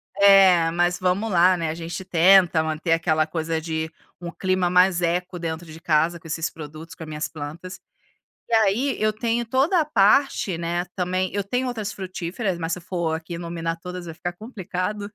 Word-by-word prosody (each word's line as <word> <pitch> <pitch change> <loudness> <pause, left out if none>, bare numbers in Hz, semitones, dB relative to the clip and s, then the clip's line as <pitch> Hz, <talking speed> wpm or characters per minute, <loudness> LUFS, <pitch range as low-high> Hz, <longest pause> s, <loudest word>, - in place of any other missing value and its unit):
É, 190 -4 +6
mas 175 +1 +1
vamos 185 +4 0
lá, 180 +1 +5
né, 165 -2 -2
a 155 - -2
gente 170 +3 -6
tenta 180 -2 +5
manter 160 +2 -2
aquela 160 -1 +1
coisa 160 0 -2
de 160 0 -3 0.3
um 170 0 -5
clima 185 -1 0
mais 180 0 +4
eco 180 +1 -1
dentro 165 0 -4
de 160 - -11
casa 165 +1 +1
com 165 - -13
esses 165 +1 -2
produtos, 155 +1 -10
com 160 - -9
as - - -9
minhas 150 +1 -3
plantas. 165 +5 -8 0.7
E 230 - +2
aí 225 +6 +2
eu 215 0 +1
tenho 230 +2 -1
toda 270 - +2
a 315 - +3
parte 210 - +2
né, 170 +1 -2
também, 185 +1 -1
eu 200 - -1
tenho 250 +6 -1
outras 220 -3 -4
frutíferas, 185 +1 -4
mas 165 0 -3
se 180 - -2
eu 175 - -14
for 170 -3 -2
aqui 160 +1 -6
nominar 170 -1 -4
todas 180 0 -7
vai 165 - -7
ficar 175 +1 -4
complicado. 205 -1 -5
175 Hz, 195 wpm, -23 LUFS, 165-195 Hz, 0.7 s, É